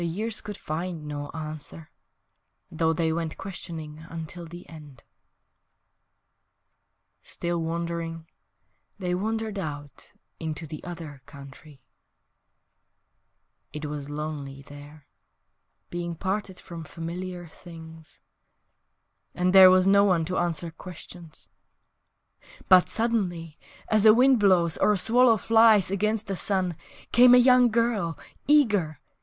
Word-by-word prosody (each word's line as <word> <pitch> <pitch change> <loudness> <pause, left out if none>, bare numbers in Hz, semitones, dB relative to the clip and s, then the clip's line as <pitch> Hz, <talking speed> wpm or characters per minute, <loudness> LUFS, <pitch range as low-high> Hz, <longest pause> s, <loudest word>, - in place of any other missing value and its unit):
The 170 - -1
years 210 +6 -3
could 210 -1 -8
find 165 0 -5
no 145 -1 -6
answer, 155 0 -8 0.8
Though 160 0 +1
they 160 0 0
went 165 -1 -4
questioning 165 -5 -8
Until 165 +1 -8
the 175 +2 -11
end........ 150 -6 -13 2.2
Still 170 -1 -3
wondering 165 0 -4 0.7
They 180 -3 -3
wandered 220 +2 -3
out 145 -5 -8 0.3
into 160 0 -5
the 155 0 -9
other 165 -6 -9
country.... 140 0 -14 1.9
It 150 +1 -6
was 145 -1 -6
lonely 145 -2 -6
there, 145 +1 -13 0.9
Being 175 -1 -4
parted 190 +1 -3
from 170 -2 -9
familiar 175 +2 -7
things, 160 -1 -13 1.1
And 180 +1 +1
there 190 -1 +10
was 185 0 +4
no 200 +1 +5
one 180 -5 +2
to 180 +3 -3
answer 170 -1 -2
questions, 165 - -12 1.2
But, 185 -1 +6
suddenly, 180 -9 -2 0.3
(As 215 0 +3
a 215 - +8
wind 255 0 +4
blows 180 -5 +3
or 210 - +3
a - - 0
swallow 230 +3 +4
flies 220 -3 +4
against 215 +2 -1
the 195 - -4
sun) 185 -2 -1 0.4
Came 245 +1 +7
a - - +7
young 250 0 +5
girl 220 -7 0 0.3
eager! 210 - +2
170 Hz, 115 wpm, -26 LUFS, 155-200 Hz, 2.2 s, there